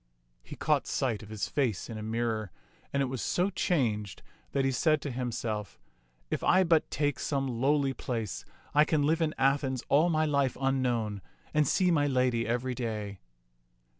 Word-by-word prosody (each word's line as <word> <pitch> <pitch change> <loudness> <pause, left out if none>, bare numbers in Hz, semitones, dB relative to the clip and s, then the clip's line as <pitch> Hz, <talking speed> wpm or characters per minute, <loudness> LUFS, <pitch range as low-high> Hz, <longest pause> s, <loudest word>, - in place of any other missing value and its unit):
He - - -10
caught - - +1
sight 115 -6 -1
of 105 - -11
his 110 -2 -3
face 120 - -1
in 115 - -7
a 110 - -5
mirror, 110 -1 -2 0.4
and 140 0 +1
it - - +1
was 130 -2 -4
so 185 +3 +1
changed 110 - -1 0.3
that 135 -1 +1
he 135 - +2
said 155 +4 +2
to 145 - -3
himself, 115 - -3 0.3
" - - -40
If - - -1
I 185 +2 +5
but 165 -3 +3
take 145 0 0
some 135 -2 -1
lowly 135 +3 +1
place, 115 -7 -4 0.3
I 150 +1 +6
can 155 -1 +1
live 160 +3 +2
in 155 -1 0
Athens 135 -1 +1
all 155 +5 +4
my 155 -1 +2
life 140 -4 +1
unknown, 120 -6 0 0.3
and 150 -2 +3
see 180 +4 +3
my 145 -3 +3
lady 125 -3 +1
every 125 +2 -1
day." 105 -5 -4
130 Hz, 180 wpm, -30 LUFS, 115-145 Hz, 0.4 s, I